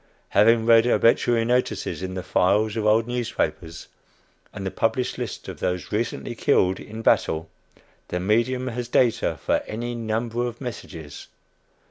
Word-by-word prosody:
Having 110 +2 +4
read 115 0 +6
obituary 115 -1 +3
notices 125 -4 -1
in 95 0 -4
the 95 - -4
files 100 +4 +2
of 110 -1 0
old 110 +1 +4
newspapers, 115 -8 -3 0.6
and 95 -2 -7
the 95 - -2
published 125 +3 -1
list - - -5
of - - -7
those 90 0 -2
recently 115 +2 -2
killed 95 -4 +2
in 110 +1 -8
battle, 80 -6 +1 0.6
the 90 - -3
medium 120 +6 +1
has 120 0 -4
data 120 -1 +2
for - - +3
any 120 +3 -4
number 115 +1 -2
of 120 0 -7
"messages." 85 - -8
115 Hz, 145 wpm, -24 LUFS, 100-120 Hz, 0.6 s, read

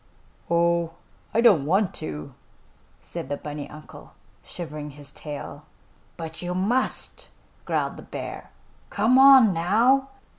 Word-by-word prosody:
"Oh, 170 0 +1 0.4
I 230 - +2
don't 190 - +5
want 190 +3 +2
to," 75 -1 -6 0.7
said - - -7
the 145 - -2
bunny 145 0 -7
uncle, 155 0 -13 0.3
shivering 150 -3 -7
his 145 0 -12
tail. 145 -1 -8 0.5
"But 160 -1 -7
you 180 0 -3
must!" 230 +8 -1 0.4
growled - - -1
the - - -9
bear. - - -7 0.4
"Come 225 +6 +3
on, 265 -6 +8
now!" 230 +11 +3
170 Hz, 120 wpm, -25 LUFS, 150-220 Hz, 0.7 s, on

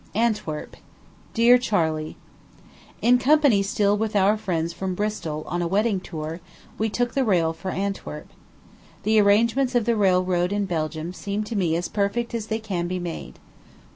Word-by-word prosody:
ANTWERP. 210 -9 -1 0.6
DEAR 240 +2 +6
CHARLEY: 160 -9 -1 0.9
In 245 +1 +5
company 280 -6 +4
still 200 +1 +1
with 215 0 -2
our 200 +1 +4
friends 170 -6 -2
from 185 +1 -3
Bristol 175 -7 -3
on 175 +2 -2
a 170 - 0
wedding 205 +2 +1
tour, 160 -2 -6 0.4
we 220 +1 +1
took 240 +3 -1
the 270 - +2
rail 170 -8 +2
for 175 +3 -6
Antwerp. 190 - -4 0.8
The 215 +1 +4
arrangements 235 +6 +3
of 240 -3 +2
the 235 0 +2
railroad 185 -3 +2
in 205 0 0
Belgium 160 -1 -3
seem 200 +2 -3
to 220 +2 -6
me 175 -5 +1
as 175 +1 -1
perfect 215 +4 -1
as 225 -2 -3
they 220 - -1
can 190 -6 -3
be 185 +1 -2
made. 170 - -6
200 Hz, 165 wpm, -24 LUFS, 175-220 Hz, 0.9 s, DEAR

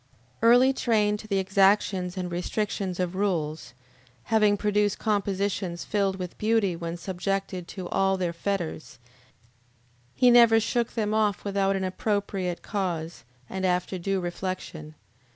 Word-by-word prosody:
Early 245 +4 +6
trained 210 -5 +1
to 215 - -10
the 200 -2 0
exactions 195 -1 +2
and 180 -1 -3
restrictions 185 +1 -2
of 180 -1 -1
rules, 165 -9 -2 0.5
having 210 -2 +3
produced 210 0 +1
compositions 200 -4 -1
filled 200 -2 0
with 180 -2 -7
beauty 215 -4 +2
when 170 0 -5
subjected 190 0 -3
to 185 -3 -7
all 195 +1 +1
their 175 -2 -2
fetters, 170 -6 -4 1.2
he 250 -1 +5
never 235 -2 +7
shook 235 +1 -1
them 215 -2 0
off 215 -2 +1
without 195 -1 +1
an 190 - -2
appropriate 190 -2 -2
cause 170 - -3 0.2
and 190 0 -5
after 180 0 0
due 195 +2 -1
reflection. 175 -3 -5
195 Hz, 135 wpm, -26 LUFS, 180-210 Hz, 1.2 s, never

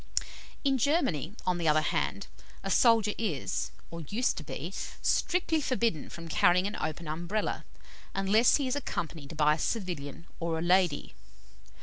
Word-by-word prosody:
In 270 -2 +2
Germany, 220 - +1
on 180 -1 +1
the 165 - 0
other 155 0 +4
hand, - - -1 0.4
a - - -2
soldier 225 -3 +5
is 185 - -1 0.2
or 170 0 -6
used 215 - 0
to 155 - -4
be 165 +5 -6 0.3
strictly 335 -3 +2
forbidden 235 - 0
from 165 0 -8
carrying 180 +3 +4
an 205 +2 -3
open 155 +1 -4
Umbrella, 175 +7 -2 0.5
unless 200 +5 +4
he 280 -3 0
is 255 - 0
accompanied 160 - -4
by 150 -1 +5
a 155 - -3
civilian 170 - -3
or 165 -1 -1
a - - -2
lady. 175 -4 +2
180 Hz, 150 wpm, -30 LUFS, 160-230 Hz, 0.5 s, soldier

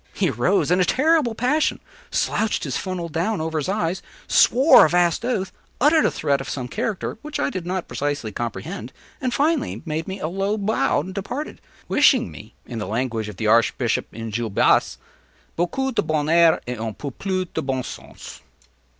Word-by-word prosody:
He 185 -7 +1
arose 135 - +1
in 180 - +4
a - - +5
terrible 285 - +2
passion, 260 +7 +1 0.3
slouched 220 -1 0
his - - -3
funnel 185 -3 -3
down 175 +7 -1
over 160 0 -2
his 150 - -3
eyes, 190 -3 -1 0.3
swore 265 +6 +6
a - - +4
vast 175 +3 +2
oath, 200 -7 -1 0.3
uttered 305 +4 +4
a - - +4
threat 140 -3 0
of - - -7
some 125 -3 -4
character 210 - -3
which 300 -1 -5
I - - 0
did 180 -6 -5
not 185 0 -2
precisely 145 -6 -3
comprehend, 115 +2 -5 0.3
and 255 -2 0
finally 300 +3 0
made 160 0 -3
me 190 +1 -5
a - - -2
low 195 +4 -1
bow 195 -10 +1
and 185 +5 -7
departed, 245 +10 -5 0.3
wishing 260 -5 +4
me, 110 +3 -12
in 120 - -6
the 105 - -4
language 110 0 -2
of 100 - -10
the 110 - -3
archbishop 115 +2 +2
in 115 0 -6
Gil 115 +1 -2
Blas, 100 - +3 0.6
“_beaucoup 265 +11 -1
de - - +2
bonheur 160 +2 +3
et 125 -2 -5
un 110 -1 -4
peu 140 - -6
plus 185 +6 -2
de 160 - -1
bon 135 -3 -2
sens_. - - -10
175 Hz, 185 wpm, -22 LUFS, 130-220 Hz, 0.6 s, swore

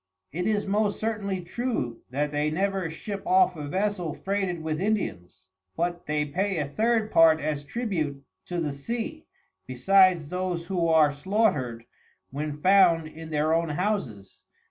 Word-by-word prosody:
It 180 +6 -2
is 210 -1 +1
most 205 +1 0
certainly 205 -4 -2
true, 175 - -3
that 145 +3 -1
they 150 +1 0
never 190 +1 -1
ship 200 +5 -6
off 185 0 +4
a 150 -2 -6
Vessel 185 -2 -1
freighted 190 -4 -2
with 160 +1 -2
Indians, 195 - -2 0.3
but 175 +1 -2
they 150 0 0
pay 185 +6 -1
a 150 -3 -1
third 220 +6 0
part 160 -1 +6
as 150 -2 -2
Tribute 155 - -3 0.2
to 175 -1 -3
the 155 -3 -1
Sea, 235 - -5 0.4
besides 175 +4 +4
those 180 -1 -2
who 175 -2 0
are 160 -2 +5
slaughter'd, 145 - 0 0.5
when 145 +2 -4
found 180 -4 +5
in 160 +1 -10
their 155 +1 +1
own 165 0 +1
Houses. 145 - -3
170 Hz, 150 wpm, -26 LUFS, 150-200 Hz, 0.5 s, part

